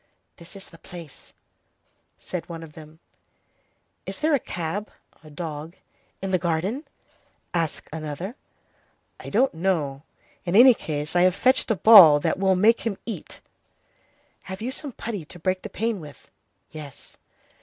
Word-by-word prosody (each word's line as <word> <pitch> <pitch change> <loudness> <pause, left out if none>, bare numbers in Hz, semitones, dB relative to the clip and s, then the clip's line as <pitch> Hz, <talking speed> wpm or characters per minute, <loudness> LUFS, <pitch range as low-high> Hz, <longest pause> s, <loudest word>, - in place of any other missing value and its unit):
"This 170 +3 -13
is 195 - -11
the 165 - -16
place," 170 -5 -11 0.9
said 180 -1 -6
one 165 -1 -7
of 155 -2 -12
them. 155 0 -13 1.1
"Is - - -5
there 310 +1 +2
a 285 - +4
cab 180 +2 -4 0.5
[dog] 160 0 -6 0.5
in 195 - -2
the 185 - +2
garden?" 180 - -2 0.7
asked 165 -3 -2
another. 160 - -5 0.8
"I - - -8
don't 255 +6 +2
know. 160 -6 -1 0.4
In 175 +1 -2
any 250 +3 +9
case, 150 -5 -4
I 175 - +5
have 185 0 +4
fetched 255 +5 +3
a 220 - +2
ball 185 -9 +9
that 150 - -1
we'll 190 -1 +3
make 220 +5 +4
him 220 -4 -3
eat." 230 - -7 1.0
"Have 190 0 -7
you 240 +4 -3
some 285 +1 -6
putty 210 -7 -5
to 175 - -11
break 185 +2 -1
the - - -7
pane 225 -1 -2
with?" 150 -3 -13 0.4
"Yes." 150 -3 -11
180 Hz, 150 wpm, -24 LUFS, 160-210 Hz, 1.1 s, any